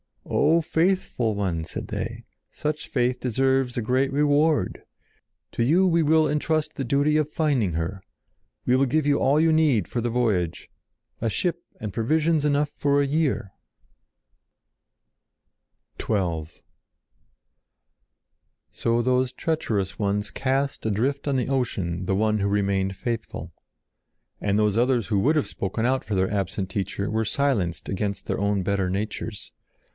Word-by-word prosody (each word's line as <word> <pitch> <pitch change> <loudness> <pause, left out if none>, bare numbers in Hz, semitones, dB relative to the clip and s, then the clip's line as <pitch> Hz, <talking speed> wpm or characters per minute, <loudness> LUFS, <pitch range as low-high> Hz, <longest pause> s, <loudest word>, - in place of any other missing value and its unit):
"O 165 +2 +3
faithful 160 - 0
one!" 90 -5 -1
said - - -5
they. - - -4 0.3
"Such 150 0 -3
faith 125 -1 0
deserves 130 +1 +1
a - - +1
great 130 +4 +1
reward. 145 - +2 0.7
To 115 - 0
you 170 +10 +4
we 170 -2 +3
will 155 0 +4
entrust 150 +1 0
the 135 - -3
duty 140 +4 +2
of 155 -1 0
finding 135 - +1
her. 85 +4 -3 0.6
We 125 - +3
will 135 +1 +3
give 155 +4 +1
you 145 -1 +3
all 140 +3 +3
you 160 0 +4
need 145 - +3
for 120 - -2
the 120 - -1
voyage—a 110 0 -3
ship 170 - -1 0.2
and 105 -3 -5
provisions 155 - +1
enough 145 0 +1
for 145 0 +2
a - - +2
year!" 140 - 0 2.5
[Illustration: 110 - -1
ADRIFT 100 - +2
ON 85 -3 -2
THE - - -18
SEA] - - -25
XII - - -29 2.2
So 115 +1 +2
those 130 +1 +1
treacherous 110 - -2
ones 105 0 -1
cast 135 0 -1
adrift 130 +8 0
on 140 - +1
the 130 0 0
ocean 95 -10 -1
the 95 - +1
one 110 +1 +1
who 100 - +1
remained 100 -1 0
faithful. 115 +2 -4 0.9
And 100 0 0
those 105 -1 +2
others 120 -3 +2
who 105 -3 +1
would 150 +10 +3
have 150 - +1
spoken 110 +4 -3
out 130 +1 +1
for 105 - -3
their 95 0 +1
absent 100 -1 -2
Teacher 100 0 -2
were 110 +1 0
silenced 110 -10 0
against 100 +1 -2
their - - -2
own 100 -1 +1
better 95 -1 0
natures. 105 +2 -4
120 Hz, 155 wpm, -25 LUFS, 100-145 Hz, 2.5 s, you